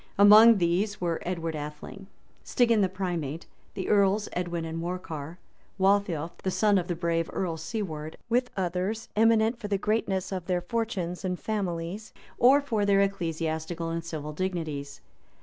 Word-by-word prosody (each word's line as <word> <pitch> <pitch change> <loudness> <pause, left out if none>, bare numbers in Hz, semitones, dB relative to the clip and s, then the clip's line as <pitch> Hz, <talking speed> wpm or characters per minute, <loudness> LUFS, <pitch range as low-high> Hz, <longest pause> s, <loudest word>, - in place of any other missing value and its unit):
Among 215 +3 +8
these 185 +4 0
were 170 -2 -1
Edgar 165 -3 -2
Atheling, 150 +6 -8 0.4
Stigand 230 -4 +3
the 190 - +2
primate, 175 -5 -3 0.3
the 190 - -4
earls 205 0 +3
Edwin 175 -2 -2
and 165 0 -4
Morcar, 165 -2 -5 0.4
Waltheof, 190 -5 +2
the 190 - -1
son 205 +1 +3
of 175 - -4
the 175 - -2
brave 165 -1 -1
Earl 175 -4 -2
Siward, 160 -3 -5
with 245 +2 +1
others, 190 +4 -2
eminent 225 +1 +3
for 210 - -5
the 200 -1 0
greatness 195 -2 -1
of 185 -3 -4
their 180 -1 0
fortunes 185 -3 -3
and 180 -1 -2
families, 195 0 -4 0.3
or 270 +4 +6
for 225 -7 -1
their 200 -1 +4
ecclesiastical 165 -3 -2
and 165 0 -3
civil 150 -2 -6
dignities. 155 -5 -4
185 Hz, 150 wpm, -27 LUFS, 165-205 Hz, 0.4 s, Among